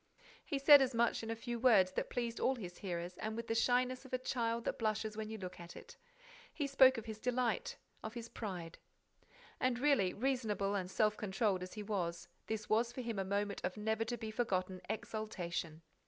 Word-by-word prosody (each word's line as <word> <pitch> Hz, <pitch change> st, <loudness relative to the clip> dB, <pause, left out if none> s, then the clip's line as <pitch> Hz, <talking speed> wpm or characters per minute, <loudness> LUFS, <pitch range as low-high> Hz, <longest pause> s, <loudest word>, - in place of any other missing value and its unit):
He 285 Hz, -, -2 dB
said 280 Hz, +1 st, +9 dB
as 260 Hz, -2 st, +1 dB
much 235 Hz, 0 st, +2 dB
in 225 Hz, -, -6 dB
a 225 Hz, -, -1 dB
few 235 Hz, +1 st, -4 dB
words 215 Hz, -7 st, +5 dB
that -, -, -2 dB
pleased 235 Hz, -1 st, -2 dB
all 265 Hz, -, +2 dB
his 180 Hz, -7 st, -8 dB
hearers 175 Hz, -2 st, -4 dB
and 215 Hz, 0 st, -3 dB
with 230 Hz, -, -3 dB
the 225 Hz, -, -1 dB
shyness 250 Hz, +2 st, +2 dB
of 265 Hz, -, -13 dB
a -, -, +3 dB
child 235 Hz, -2 st, -1 dB
that -, -, -2 dB
blushes 215 Hz, -1 st, -1 dB
when 215 Hz, 0 st, -4 dB
you 220 Hz, -, -5 dB
look 185 Hz, -3 st, -7 dB
at 170 Hz, 0 st, -10 dB
it. -, -, -11 dB, 0.6 s
He 290 Hz, -, -2 dB
spoke 265 Hz, -2 st, +6 dB
of 225 Hz, -, -5 dB
his 220 Hz, -1 st, -6 dB
delight, 250 Hz, -, 0 dB, 0.2 s
of 220 Hz, +2 st, -6 dB
his 235 Hz, -1 st, -5 dB
pride. 180 Hz, -8 st, -6 dB, 0.8 s
And 255 Hz, -2 st, +1 dB
really, 250 Hz, -9 st, +3 dB
reasonable 220 Hz, -5 st, 0 dB
and 185 Hz, -3 st, -1 dB
self 215 Hz, +2 st, +2 dB
controlled 195 Hz, -1 st, 0 dB
as 180 Hz, 0 st, -6 dB
he 210 Hz, -, -5 dB
was, 175 Hz, -5 st, -2 dB, 0.2 s
this 220 Hz, -1 st, -3 dB
was 230 Hz, +2 st, +2 dB
for 255 Hz, -, -5 dB
him 230 Hz, -4 st, -3 dB
a -, -, +1 dB
moment 200 Hz, +1 st, -1 dB
of 180 Hz, +3 st, -2 dB
never 220 Hz, +1 st, 0 dB
to 240 Hz, +2 st, -3 dB
be 220 Hz, -1 st, -5 dB
forgotten 185 Hz, -5 st, -1 dB
exultation. 175 Hz, -7 st, -4 dB
220 Hz, 210 wpm, -36 LUFS, 195-240 Hz, 0.8 s, said